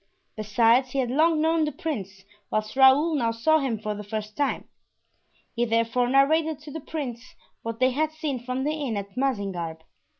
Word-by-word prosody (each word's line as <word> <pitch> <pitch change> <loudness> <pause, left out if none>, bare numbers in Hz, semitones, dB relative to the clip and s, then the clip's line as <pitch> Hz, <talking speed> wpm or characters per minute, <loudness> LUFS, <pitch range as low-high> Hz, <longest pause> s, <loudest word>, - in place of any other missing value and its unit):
Besides, 230 +4 +3
he - - -2
had 250 -3 0
long 315 +3 +3
known 320 0 +2
the 300 - -1
prince, 195 - -5 0.2
whilst 215 +1 -2
Raoul 270 +5 +6
now 240 -6 +1
saw 270 +8 +2
him 260 -6 -1
for 215 0 -4
the 210 0 -7
first 215 0 -5
time. 285 -1 -1 0.9
He 235 - +1
therefore 230 +1 +1
narrated 310 +4 +3
to 300 -1 -10
the 320 - -6
prince 255 -6 -6 0.3
what 230 0 -5
they 255 0 +3
had 310 +4 0
seen 305 -4 -3
from 255 +1 -3
the 300 +2 0
inn 280 -8 -3
at 200 0 -7
Mazingarbe. 195 -11 -2
255 Hz, 180 wpm, -25 LUFS, 220-300 Hz, 0.9 s, Raoul